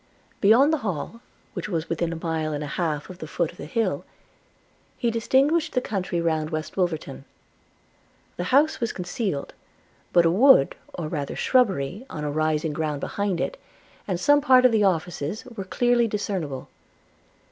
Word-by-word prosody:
Beyond 245 +9 +5
the 315 - +1
Hall, 215 - -4 0.3
which - - -5
was 165 -3 -2
within 165 0 -1
a - - -3
mile 160 -2 -2
and 145 0 -3
a 145 - -5
half 150 -4 -1
of 180 - -12
the 155 - -6
foot 165 +1 -1
of - - -21
the - - -7
hill, 225 +7 -1 0.9
he 235 - 0
distinguished 275 +8 +2
the 250 - +3
country 190 -7 -2
round 160 -2 0
West 155 -1 -4
Wolverton; 160 -7 -2 0.6
– - - -37
the 175 - -2
house 290 +9 +3
was 235 -2 -1
concealed; 180 -4 -3 0.6
but 175 -1 +5
a 165 - +4
wood, 230 - +5 0.2
or 170 -3 -4
rather 145 -3 -4
shrubbery, 200 - +1
on 150 - -6
a 150 - -2
rising 155 0 0
ground 150 -2 -2
behind 200 +2 -2
it, - - -3 0.5
and 185 -4 -1
some 290 +6 +4
part 255 -3 +5
of 250 - +6
the 220 -2 +3
offices, 175 - -1
were 230 -6 -7
clearly 240 +3 +2
discernible. 185 -10 -3
180 Hz, 170 wpm, -25 LUFS, 155-230 Hz, 0.9 s, of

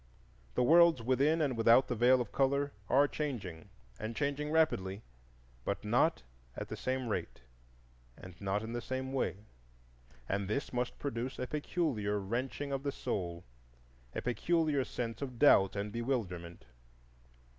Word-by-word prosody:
The - - +3
worlds 165 -2 +6
within 140 +6 +3
and 135 -4 0
without 115 +3 +5
the - - -1
Veil 125 +2 +4
of 120 - -5
Color 140 +1 +1 0.2
are 140 +3 +5
changing, 105 - -5 0.3
and 110 +1 -4
changing 150 +2 -1
rapidly, 110 -11 +1 0.6
but - - -3
not - - +2 0.3
at - - -5
the - - -4
same 130 -1 -2
rate, 110 - -3 1.0
not 100 +1 -1
in 115 +1 -5
the 120 - -2
same 130 +2 -4
way; 105 -6 -2 0.8
and 100 0 -1
this 120 +8 -2
must 125 0 -2
produce 130 -1 -3
a 125 - -2
peculiar 140 - -1
wrenching 125 +7 -3
of 135 -1 -1
the 140 0 -2
soul, 85 -8 -3 0.7
a - - -3
peculiar 150 +2 +1
sense 115 -1 -4
of 130 -3 -5
doubt 100 -8 +5
and 100 +1 -3
bewilderment. 100 -9 -3
125 Hz, 145 wpm, -33 LUFS, 105-140 Hz, 1.0 s, worlds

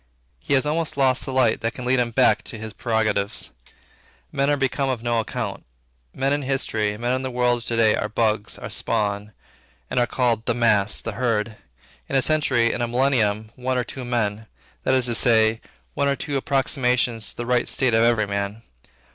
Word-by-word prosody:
He 140 - 0
has 130 - +2
almost 155 0 -1
lost 130 -2 +2
the - - -4
light, 130 -4 +2
that 115 - -2
can 125 - -6
lead 125 +1 +2
him 120 -1 +1
back 125 +2 +3
to 115 - -6
his 110 0 -7
prerogatives. 110 -4 -1 0.8
Men 140 0 +1
are 145 - +2
become 135 0 0
of 120 -3 -2
no 120 -1 +1
account. 110 - -4 0.5
Men 135 - 0
in 145 - 0
history, 110 -6 -1
men 120 +2 -1
in - - -5
the 130 - -3
world 125 -1 +1
of 120 - -12
to 115 - -1
day 110 -2 +4
are 105 - -2
bugs, 110 -1 0
are - - -7
spawn, 105 0 -1 0.6
and - - +1
are 120 - +2
called 120 -3 0
'the 120 - +1
mass' 110 -4 +2
and - - -7
'the 115 - -3
herd.' 115 -3 0 0.5
In - - -2
a 135 - +4
century, 130 -7 +2
in - - -3
a 120 - 0
millennium, 115 -4 +1
one 130 0 -2
or 125 - +1
two 130 +2 -7
men; 110 -3 -2 0.4
that 130 - +3
is 130 -2 +1
to 120 - 0
say, 110 -2 +3 0.3
one 140 - 0
or 140 - +2
two 145 +1 -4
approximations 125 -4 +1
to - - -4
the 120 - -4
right 125 0 +1
state 130 -3 +2
of 115 - +4
every 115 -2 +3
man. 100 +2 -4
120 Hz, 210 wpm, -23 LUFS, 110-130 Hz, 0.8 s, day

